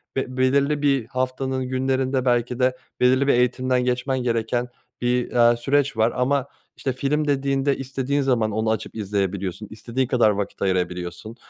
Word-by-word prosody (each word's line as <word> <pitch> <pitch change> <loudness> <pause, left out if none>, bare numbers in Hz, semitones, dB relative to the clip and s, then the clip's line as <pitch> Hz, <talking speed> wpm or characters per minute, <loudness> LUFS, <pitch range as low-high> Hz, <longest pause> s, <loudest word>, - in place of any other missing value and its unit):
ve 130 -1 -3
belirli 140 +3 +2
bir 135 -5 +2
haftanın 130 +1 -2
günlerinde 130 0 0
belki 120 0 +1
de 130 0 +2 0.2
belirli 130 +2 +3
bir - - +5
eğitimden 125 +1 +1
geçmen 125 +1 -1
gereken 120 +1 0 0.3
bir, 125 0 0 0.2
eee, 120 - 0
süreç 135 +1 +1
var 110 +2 +2
ama 130 +2 +1 0.3
işte 130 - -2
film 150 +3 -1
dediğinde 140 0 +1
istediğin 135 +1 -2
zaman 120 -5 +1
onu 110 +1 0
açıp 110 -1 -4
izleyebiliyorsun 100 -1 -2
istediğin 120 +4 -2
kadar 120 -3 +3
vakit 100 -1 -3
ayırabiliyorsun, 90 +2 -2
125 Hz, 150 wpm, -23 LUFS, 115-135 Hz, 0.3 s, bir